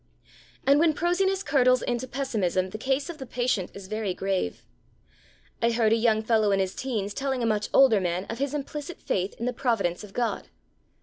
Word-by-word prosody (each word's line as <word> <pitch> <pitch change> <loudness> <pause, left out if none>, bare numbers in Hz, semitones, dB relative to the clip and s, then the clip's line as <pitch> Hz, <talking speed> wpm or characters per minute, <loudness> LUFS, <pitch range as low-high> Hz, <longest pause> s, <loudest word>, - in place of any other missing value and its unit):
And 280 +2 +5
when 320 -1 +3
prosiness 380 +4 +1
curdles 255 -5 +3
into 245 +1 -2
pessimism 205 -9 -1
the 215 - -6
case 270 +4 0
of 335 -3 -7
the 265 - -6
patient 245 -8 -1
is 200 -1 -9
very 215 -3 -2
grave. 190 - -2 1.0
I 235 - +3
heard 225 -2 +3
a - - +5
young 220 -1 +2
fellow 220 -2 +3
in 195 -1 +2
his 190 -1 0
teens 215 -6 -3
telling 265 -1 -2
a - - +2
much 215 -2 0
older 255 -6 +6
man 180 +1 -1
of 230 +3 -6
his 280 +1 -1
implicit 295 +3 -5
faith 190 +1 -2
in 235 - -5
the 250 - -1
providence 225 -9 0
of 200 -2 -11
God. 240 -2 -2
235 Hz, 195 wpm, -26 LUFS, 200-270 Hz, 1.0 s, older